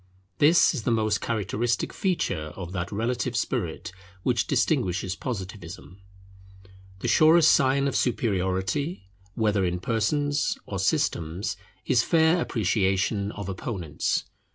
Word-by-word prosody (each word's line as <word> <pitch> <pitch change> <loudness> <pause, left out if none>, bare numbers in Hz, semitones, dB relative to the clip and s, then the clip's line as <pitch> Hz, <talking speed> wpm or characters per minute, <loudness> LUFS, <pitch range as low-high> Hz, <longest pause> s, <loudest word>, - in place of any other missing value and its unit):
This 160 +5 +5
is 140 - -3
the 115 - -1
most 110 -2 +1
characteristic 115 +2 -1
feature 80 - -1
of 90 -2 -7
that 85 -2 -4
relative 115 +4 -1
spirit - - -2 0.3
which - - +1
distinguishes 95 +1 0
Positivism. 95 - -7 1.0
The - - -2
surest 160 0 +6
sign 140 -1 +3
of 140 - -2
superiority, 95 - -1 0.2
whether 105 -3 +1
in 90 -1 -1
persons 140 +8 0
or - - -5
systems, 90 +6 -1 0.3
is 125 -3 +3
fair 165 +4 +3
appreciation 100 - 0
of 100 -2 -6
opponents. 90 -5 -2
105 Hz, 115 wpm, -26 LUFS, 95-130 Hz, 1.0 s, surest